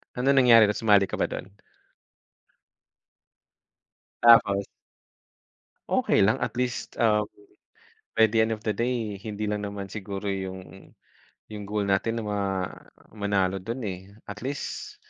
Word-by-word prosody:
Anong 135 +3 +2
nangyari 120 -3 +7
na - - +2
sumali 105 -3 +4
ka - - -5
ba - - +2
dun? 95 - -7 2.7
Tapos? 100 -4 +6 1.2
Okey - - +2
lang, 110 - +1
at - - -3
least, 125 -1 -3
um, 105 -2 +2 0.9
by 110 - +6
the 110 +1 +2
end 110 0 +2
of 110 - -21
the 110 - +1
day, 115 -2 -2
hindi 105 0 -5
lang 105 -1 -2
naman 100 -1 -7
siguro 100 -1 -6
yung 95 0 -7 0.6
yung 105 -1 -6
goal 105 0 -1
natin 100 +4 0
na 110 - -6
ma 105 - -1 0.7
manalo 100 -3 0
dun 115 +7 -5
eh 95 -2 -5 0.2
at 105 +1 -7
least 140 +1 -5
105 Hz, 135 wpm, -26 LUFS, 100-115 Hz, 2.7 s, nangyari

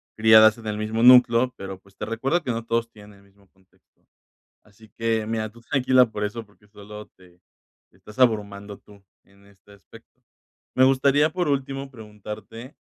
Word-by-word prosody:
criadas 110 0 +5
en 110 - -11
el 105 0 -4
mismo 110 +1 -3
núcleo, 125 0 +5
pero, 95 -1 -9
pues, 100 0 -25
te - - -6
recuerdo 135 +10 -2
que 130 - -3
no 115 0 -4
todos 115 0 -3
tienen 105 -2 -16
el - - -24
mismo 100 0 -28
contexto. 95 -1 -36 0.6
Así 105 +1 -21
que, 115 -1 -1
mira, 110 -1 -3
tú 115 +2 -19
tranquila 130 +1 +2
por 105 -1 -5
eso, 110 +2 -6
porque 105 0 -27
solo 105 0 -12
te 90 -1 -22 0.5
te 95 - -29
estás 105 +5 -16
abrumando 105 -4 -1
tú 100 -1 -20 0.2
en 100 0 -26
este 100 0 -24
aspecto. 115 +5 -20 0.5
Me 130 - +2
gustaría, 140 +3 +2
por 180 +2 -3
último, 135 -1 -3
preguntarte 110 +3 -11
110 Hz, 175 wpm, -23 LUFS, 105-125 Hz, 0.6 s, criadas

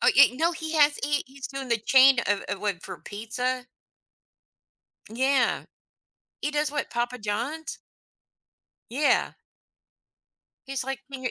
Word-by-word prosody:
Oh - - +5
yeah, 280 -2 +7
no, 330 +5 +1
he 320 0 -5
has 295 -1 +4
he 290 0 0
he's 270 0 -8
doing 270 -1 -6
the 235 -1 +2
chain 265 +3 +6
of 205 -1 +1
of 200 - -5
what 200 -4 -2
for - - -8
pizza. 245 +4 -3 1.4
Yeah. 260 +4 +1 0.8
He 295 - -1
does 300 0 0
what 295 - -2
Papa 240 +1 -2
John's? 240 +10 -3 1.1
Yeah. 280 +5 +2 1.4
He's 270 -2 -3
like, 270 0 -4
he 255 -2 -3
265 Hz, 135 wpm, -26 LUFS, 240-290 Hz, 1.4 s, yeah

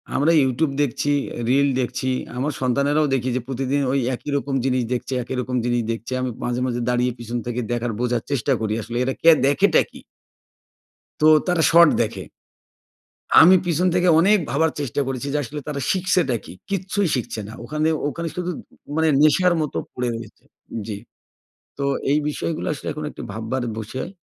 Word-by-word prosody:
আমরা 150 +4 +3
YouTube 135 +3 0
দেখছি, 145 +1 0 0.2
অ্যা 120 - -5
reel 140 +2 +4
দেখছি, 130 +1 -2 0.3
আমার 140 +4 -1
সন্তানেরাও 140 +4 +2
দেখি 130 -1 0
যে 130 - -1
প্রতিদিন 135 +2 -1
ওই 140 - +2 0.2
একই 145 - -9
রকম 140 0 -4
জিনিস 130 -2 +1
দেখছে, 125 +2 -3
একই 130 - -5
রকম 125 +1 -4
জিনিস 120 -1 +1
দেখছি। 115 +2 -6
আমি 130 - -1
মাঝে, 120 +1 -1
মাঝে 120 -1 -2
দাঁড়িয়ে 125 0 +1
পিছন 120 +1 -4
থেকে 120 0 -2
দেখার 120 -1 -1
বোঝার 120 -2 0
চেষ্টা 135 0 +1
করি 110 -1 -1
আসলে 120 +3 -5
এরা 130 - -1
কে 165 - +7 0.2
দেখেটা 140 - +4
কী? - - -12 1.2
তো - - +4 0.2
তারা 175 -2 +2
শর্ট 170 -1 +8
দেখে। 110 - -3 1.2
আমি 180 +3 +8
পিছন 175 +1 +1
থেকে 180 0 +2
অনেক 205 +5 +5
ভাবার 160 +3 +2
চেষ্টা 140 0 -1
করেছি 135 +1 -3
যে - - +1
আসলে 145 +5 -6
তারা 140 -2 -3
শিখছেটা 180 -8 +1
কী? - - -10 0.2
কিচ্ছুই 195 0 -1
শিখছে 120 -3 -4
না 110 - -9
ওখানে, 150 +6 -1 0.2
ওখানে 170 +4 -5
শুধু 180 0 -2 0.4
মানে 160 0 +2 0.2
নেশার 180 +4 +4
মতো 150 - -3 0.2
পড়ে 125 -1 -2
রয়েছে 115 -2 -10 0.4
জি। 105 -2 -4 0.8
তো 140 - -2 0.3
এই 150 - +4
বিষয়গুলো 160 +2 -3
আসলে 145 - -8
এখন 150 +1 -6
একটু - - -10
ভাববার 115 +4 -3
বিষয়। 120 +9 -5
135 Hz, 175 wpm, -22 LUFS, 120-155 Hz, 1.2 s, শর্ট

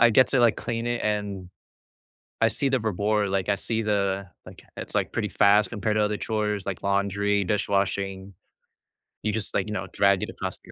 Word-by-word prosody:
I 120 0 +7
get 130 +3 +5
to, 130 - +2
like, 120 -2 +4
clean 115 0 -3
it 120 0 -1
and, 105 -3 -2 0.9
I 115 0 +4
see 135 +4 0
the 130 -1 +2
reward, 105 -1 0
like, 95 0 -1
I 100 - +3
see 115 +2 -2
the 100 -2 0 0.2
like, - - -12 0.2
it's - - -7
like - - 0
pretty - - -1
fast 105 +2 +4
compared 105 0 -1
to 105 - +3
other 105 0 0
chores 105 -3 -2
like 95 -1 -4
laundry, 100 +1 +1
dishwashing. 100 -1 -1 0.9
You 105 - +1
just 110 0 -2
like, 100 - 0
you 105 - -3
know, 95 -2 -3
drag 100 -2 +3
it - - -3
across - - -5
the. - - -16
105 Hz, 200 wpm, -25 LUFS, 100-110 Hz, 0.9 s, I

